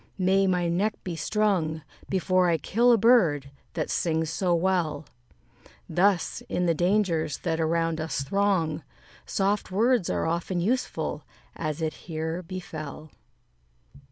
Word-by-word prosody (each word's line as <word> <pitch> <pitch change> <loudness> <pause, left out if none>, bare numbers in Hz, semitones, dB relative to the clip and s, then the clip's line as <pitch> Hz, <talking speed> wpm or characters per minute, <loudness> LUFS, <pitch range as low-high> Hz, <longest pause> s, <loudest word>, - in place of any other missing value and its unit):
may 190 +1 +3
my 180 -2 +1
neck 195 +6 0
be 175 -3 -4
strung, 165 -3 0 0.3
Before 185 -1 +2
I 165 - +3
kill 235 - +3
a 235 - +6
bird 175 - +3 0.2
that 155 -3 -2
sings 160 -1 0
so 175 +1 +1
well." 165 -4 0 0.8
Thus, 180 +2 +1
in 180 - 0
the 170 - +3
dangers 175 -4 +1
that 165 -2 -1
around 165 0 0
us 160 -3 -2
throng, 170 -2 +1 0.5
Soft 200 +1 0
words 225 +1 +2
are - - 0
often 170 +2 -1
useful, 240 +9 -1 0.3
as 155 0 -3
it 155 - -1 0.2
here 160 +2 -3
befell. 155 -4 -7
175 Hz, 130 wpm, -26 LUFS, 160-195 Hz, 0.8 s, a